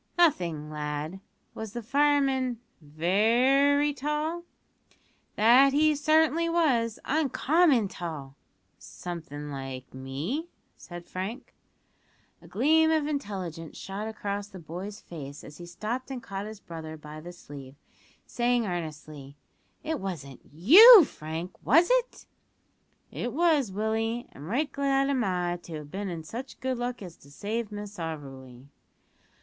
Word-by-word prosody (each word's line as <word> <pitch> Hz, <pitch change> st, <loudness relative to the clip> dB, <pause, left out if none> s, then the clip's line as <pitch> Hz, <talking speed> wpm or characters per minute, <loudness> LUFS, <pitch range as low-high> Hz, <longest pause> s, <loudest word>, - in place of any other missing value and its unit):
"Nothing, 170 Hz, -, +2 dB
lad. 150 Hz, +4 st, -4 dB, 0.3 s
Was 220 Hz, -2 st, -7 dB
the 240 Hz, -1 st, -5 dB
fireman 270 Hz, -1 st, +2 dB, 0.2 s
very 240 Hz, -, +3 dB
tall?" 300 Hz, +5 st, -3 dB, 0.9 s
"That 250 Hz, +6 st, +6 dB
he 305 Hz, +1 st, +4 dB
certainly 315 Hz, +3 st, +3 dB
was 250 Hz, -10 st, +1 dB
uncommon 295 Hz, -, +2 dB
tall." 155 Hz, -7 st, -7 dB, 0.4 s
"Something 150 Hz, -4 st, -7 dB
like 135 Hz, -2 st, -7 dB
me?" 145 Hz, -, -4 dB, 0.3 s
said 175 Hz, -1 st, -10 dB
Frank. 195 Hz, +7 st, -6 dB, 0.9 s
A -, -, -15 dB
gleam 320 Hz, +2 st, +3 dB
of 315 Hz, -2 st, +2 dB
intelligence 190 Hz, -, -5 dB
shot 200 Hz, +3 st, -5 dB
across 205 Hz, -2 st, -4 dB
the 195 Hz, -, -12 dB
boy's 180 Hz, +5 st, -7 dB
face 145 Hz, -4 st, -9 dB
as 150 Hz, -, -12 dB
he 175 Hz, -, -9 dB
stopped 230 Hz, +9 st, -4 dB
and 260 Hz, -3 st, -6 dB
caught 195 Hz, +1 st, -5 dB
his 215 Hz, -1 st, -9 dB
brother 160 Hz, -3 st, -8 dB
by 150 Hz, 0 st, -10 dB
the 175 Hz, +2 st, -9 dB
sleeve, 140 Hz, -6 st, -11 dB, 0.5 s
saying 240 Hz, -1 st, +1 dB
earnestly: 155 Hz, -5 st, -6 dB, 0.5 s
"It 315 Hz, -2 st, -2 dB
wasn't 145 Hz, -9 st, -6 dB
you, 360 Hz, -, +10 dB
Frank, 160 Hz, -, -7 dB
was 325 Hz, -, +5 dB
it?" -, -, 0 dB, 0.9 s
"It 240 Hz, -, -4 dB
was, 305 Hz, -, +2 dB
Willie, 225 Hz, +4 st, -2 dB
and 145 Hz, +3 st, -11 dB
right 275 Hz, -, -1 dB
glad 275 Hz, 0 st, +1 dB
am 260 Hz, -3 st, +1 dB
I 180 Hz, -3 st, -1 dB
to 165 Hz, -, -8 dB
have 150 Hz, -1 st, -8 dB
been 200 Hz, 0 st, -4 dB
in 165 Hz, -2 st, -5 dB
such 240 Hz, -, -8 dB
good 260 Hz, -1 st, -2 dB
luck 245 Hz, -2 st, -3 dB
as 175 Hz, -3 st, -9 dB
to 140 Hz, -, -18 dB
save 215 Hz, +8 st, -4 dB
Miss 205 Hz, 0 st, -7 dB
Auberly." 135 Hz, -6 st, -7 dB
205 Hz, 135 wpm, -28 LUFS, -, 0.9 s, you